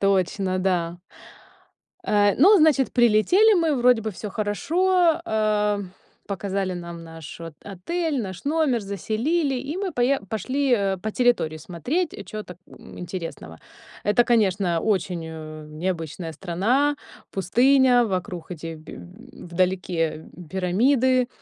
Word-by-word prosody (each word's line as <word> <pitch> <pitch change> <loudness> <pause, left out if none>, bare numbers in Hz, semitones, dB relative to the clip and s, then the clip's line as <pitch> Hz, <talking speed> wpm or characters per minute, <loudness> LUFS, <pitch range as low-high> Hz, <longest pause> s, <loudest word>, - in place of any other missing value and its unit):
Точно, 190 -1 +1
да. 175 -2 -1 1.1
Э, 205 -1 +3
ну, 390 +10 +7
значит, 300 -5 +3
прилетели 245 - +5
мы, 320 -4 +1
вроде 245 -2 +4
бы 220 - -2
всё 210 +2 -7
хорошо, 335 - +1
э, 210 -4 +1 0.5
показали 195 -1 -2
нам 170 -1 -8
нашу 165 0 -9
отель, 285 - -3
наш 185 -3 -7
номер, 290 -5 +1
заселили, 235 - -1
и 275 +6 -4
мы 390 -3 -3
пое 250 +3 +1
пошли, 260 +6 -1
э, 195 -3 0
по 215 +4 -4
территории 230 -10 +1
смотреть, 250 - -2 0.2
чего 215 0 -6
так, 180 -3 -12
м, - - -13
интересного. 165 - -7 0.5
Это, 210 +4 +3
конечно, 195 -7 +2
очень, 185 -5 -1
э, 155 -1 -8
необычная 165 0 -4
страна, 215 - 0 0.4
пустыня, 245 +6 +4
вокруг 180 -3 -4
эти 165 -1 -6
б 155 - -11 0.5
вдалеке 170 -3 -1 0.3
пирамиды. 245 +7 +2
205 Hz, 120 wpm, -24 LUFS, 180-255 Hz, 1.1 s, ну